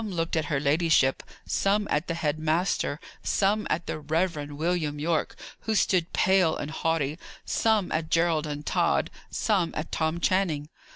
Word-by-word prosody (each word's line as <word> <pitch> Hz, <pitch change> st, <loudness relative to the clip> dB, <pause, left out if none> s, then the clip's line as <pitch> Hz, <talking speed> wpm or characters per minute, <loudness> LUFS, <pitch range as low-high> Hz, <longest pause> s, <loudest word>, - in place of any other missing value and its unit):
Some 210 Hz, -3 st, -5 dB
looked 165 Hz, 0 st, -1 dB
at 160 Hz, -1 st, +1 dB
her 145 Hz, -1 st, 0 dB
ladyship; 145 Hz, -2 st, +3 dB, 0.2 s
some 205 Hz, +1 st, +1 dB
at 150 Hz, +4 st, 0 dB
the 165 Hz, -, -2 dB
head 155 Hz, -2 st, -1 dB
master; 160 Hz, -1 st, 0 dB, 0.2 s
some 210 Hz, +2 st, +1 dB
at 170 Hz, +2 st, -1 dB
the -, -, -4 dB
Reverend 150 Hz, -1 st, -1 dB
William 160 Hz, -2 st, -1 dB
Yorke, 155 Hz, +1 st, -1 dB, 0.2 s
who 220 Hz, -, -2 dB
stood 180 Hz, -4 st, +2 dB
pale 185 Hz, -4 st, +3 dB
and 145 Hz, -, -5 dB
haughty; 160 Hz, -2 st, -1 dB, 0.3 s
some 220 Hz, -4 st, +1 dB
at 160 Hz, 0 st, -1 dB
Gerald 165 Hz, -2 st, +2 dB
and 145 Hz, 0 st, -5 dB
Tod; -, -, +1 dB, 0.2 s
some 190 Hz, -6 st, +1 dB
at 155 Hz, -, -4 dB
Tom 160 Hz, +1 st, 0 dB
Channing. 170 Hz, -6 st, +1 dB
165 Hz, 165 wpm, -27 LUFS, 150-180 Hz, 0.3 s, ladyship